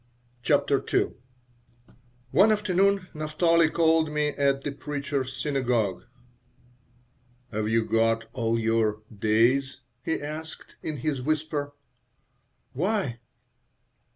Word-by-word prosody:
CHAPTER 140 Hz, +1 st, +2 dB
II -, -, +2 dB, 1.2 s
ONE 205 Hz, +4 st, +5 dB
afternoon 200 Hz, -2 st, +2 dB
Naphtali 160 Hz, +2 st, +2 dB
called 160 Hz, -1 st, +3 dB
on 150 Hz, -, -7 dB
me 150 Hz, 0 st, +2 dB
at 140 Hz, -1 st, 0 dB
the 145 Hz, -, -2 dB
Preacher's 140 Hz, -1 st, -3 dB
Synagogue 125 Hz, -9 st, 0 dB, 1.5 s
"Have 110 Hz, 0 st, -1 dB
you 115 Hz, 0 st, +2 dB
got 115 Hz, 0 st, +1 dB
all 115 Hz, -3 st, 0 dB
your 110 Hz, -2 st, +1 dB
'days'?" 120 Hz, +6 st, +2 dB, 0.2 s
he 160 Hz, -, -1 dB
asked, 155 Hz, +2 st, -8 dB
in 155 Hz, -2 st, -4 dB
his 140 Hz, 0 st, -2 dB
whisper 150 Hz, 0 st, -2 dB, 1.0 s
"Why?" 180 Hz, -, -1 dB
140 Hz, 100 wpm, -26 LUFS, 115-155 Hz, 1.5 s, ONE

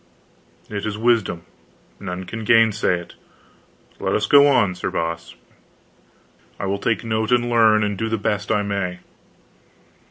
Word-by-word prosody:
"It 100 Hz, -1 st, -5 dB
is 105 Hz, -1 st, -3 dB
wisdom; 110 Hz, -7 st, +1 dB, 0.6 s
none 90 Hz, -2 st, -5 dB
can 110 Hz, +5 st, -6 dB
gainsay 110 Hz, -5 st, +3 dB
it. 85 Hz, -, -14 dB, 0.9 s
Let -, -, -1 dB
us 105 Hz, -, +1 dB
go 140 Hz, +6 st, +6 dB
on, 105 Hz, -9 st, +3 dB
Sir 90 Hz, -, -4 dB
Boss. 85 Hz, 0 st, -4 dB, 1.2 s
I -, -, -3 dB
will 100 Hz, +1 st, -2 dB
take 110 Hz, +1 st, -1 dB
note 110 Hz, 0 st, -1 dB
and 120 Hz, 0 st, +2 dB
learn, 110 Hz, -2 st, +4 dB
and 105 Hz, -2 st, -2 dB
do 115 Hz, -, -1 dB
the 110 Hz, -, 0 dB
best 105 Hz, 0 st, -2 dB
I 105 Hz, -2 st, +1 dB
may." 100 Hz, -3 st, -3 dB
105 Hz, 150 wpm, -21 LUFS, 95-115 Hz, 1.2 s, go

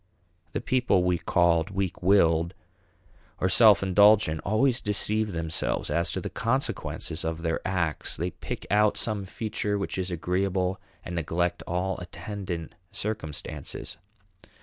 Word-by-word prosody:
The -, -, -2 dB
people 125 Hz, -8 st, +2 dB
we 90 Hz, -1 st, +1 dB
called 85 Hz, -2 st, +2 dB
weak 95 Hz, -2 st, -3 dB
willed 85 Hz, -2 st, +3 dB, 0.8 s
or 95 Hz, -, +2 dB
self 100 Hz, +1 st, +6 dB
indulgent 100 Hz, -4 st, +5 dB
always 120 Hz, +5 st, +2 dB
deceive 105 Hz, +1 st, +1 dB
themselves 80 Hz, -2 st, -2 dB
as 85 Hz, 0 st, +2 dB
to -, -, -1 dB
the -, -, -5 dB
consequences 115 Hz, -, -2 dB
of 80 Hz, 0 st, -3 dB
their 80 Hz, -1 st, 0 dB
acts. 85 Hz, -5 st, -1 dB
They 90 Hz, +2 st, -2 dB
pick -, -, -6 dB
out 105 Hz, 0 st, +3 dB
some 105 Hz, -3 st, -2 dB
feature 105 Hz, +1 st, -2 dB
which 100 Hz, -1 st, -3 dB
is 95 Hz, 0 st, -2 dB
agreeable 90 Hz, +2 st, -1 dB, 0.2 s
and 90 Hz, -, -5 dB
neglect 85 Hz, +1 st, -1 dB
all 90 Hz, +2 st, -1 dB
attendant 90 Hz, -1 st, -6 dB, 0.2 s
circumstances. 100 Hz, -8 st, -4 dB
95 Hz, 130 wpm, -27 LUFS, 85-105 Hz, 0.8 s, self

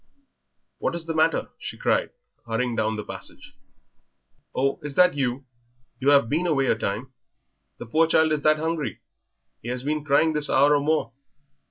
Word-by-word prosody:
"What -, -, -1 dB
is 170 Hz, -1 st, -4 dB
the 165 Hz, -, -3 dB
matter?" 160 Hz, +1 st, +1 dB
she -, -, -7 dB
cried, -, -, +1 dB, 0.4 s
hurrying 115 Hz, +1 st, -1 dB
down 110 Hz, 0 st, 0 dB
the 105 Hz, -, -5 dB
passage. -, -, -10 dB, 1.0 s
"Oh, 135 Hz, +1 st, 0 dB
is 150 Hz, -2 st, -6 dB
that 180 Hz, 0 st, +5 dB
you? 135 Hz, -1 st, -2 dB, 0.5 s
You 135 Hz, +1 st, +2 dB
have 140 Hz, -5 st, +5 dB
been 165 Hz, +8 st, 0 dB
away 140 Hz, -5 st, +2 dB
a 125 Hz, -, +2 dB
time. 110 Hz, +4 st, -4 dB, 0.6 s
The -, -, -8 dB
poor 160 Hz, +8 st, +2 dB
child 160 Hz, -1 st, +3 dB
is 150 Hz, -1 st, 0 dB
that 155 Hz, +1 st, +4 dB
hungry 160 Hz, -1 st, -3 dB, 0.6 s
he -, -, -10 dB
has 125 Hz, 0 st, -3 dB
been 150 Hz, +1 st, -2 dB
crying 155 Hz, +2 st, +3 dB
this 150 Hz, -1 st, 0 dB
hour 145 Hz, +2 st, +4 dB
or -, -, +3 dB
more. 150 Hz, -5 st, 0 dB
145 Hz, 175 wpm, -24 LUFS, 125-160 Hz, 1.0 s, that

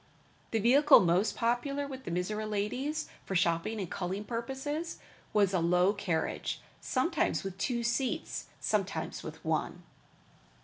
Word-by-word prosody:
The 225 Hz, -, 0 dB
vehicle 270 Hz, +7 st, +7 dB
most 180 Hz, +4 st, +2 dB
popular 260 Hz, +5 st, 0 dB
with 265 Hz, -2 st, -8 dB
the -, -, -4 dB
Mizora 210 Hz, +5 st, -2 dB
ladies 255 Hz, +10 st, -1 dB, 0.2 s
for 190 Hz, -, -4 dB
shopping 170 Hz, +5 st, +1 dB
and 190 Hz, -, -2 dB
culling 190 Hz, +4 st, -3 dB
purposes, 265 Hz, +8 st, -3 dB, 0.3 s
was 200 Hz, -3 st, +3 dB
a -, -, +3 dB
very 170 Hz, -1 st, +1 dB
low 180 Hz, +3 st, +4 dB
carriage, 190 Hz, -6 st, -2 dB, 0.2 s
sometimes 260 Hz, 0 st, 0 dB
with 195 Hz, -2 st, -5 dB
two 235 Hz, +2 st, 0 dB
seats, 235 Hz, +2 st, -1 dB
sometimes 195 Hz, -6 st, -1 dB
with 160 Hz, +1 st, -9 dB
one. 160 Hz, +2 st, -1 dB
210 Hz, 140 wpm, -31 LUFS, 180-260 Hz, 0.3 s, vehicle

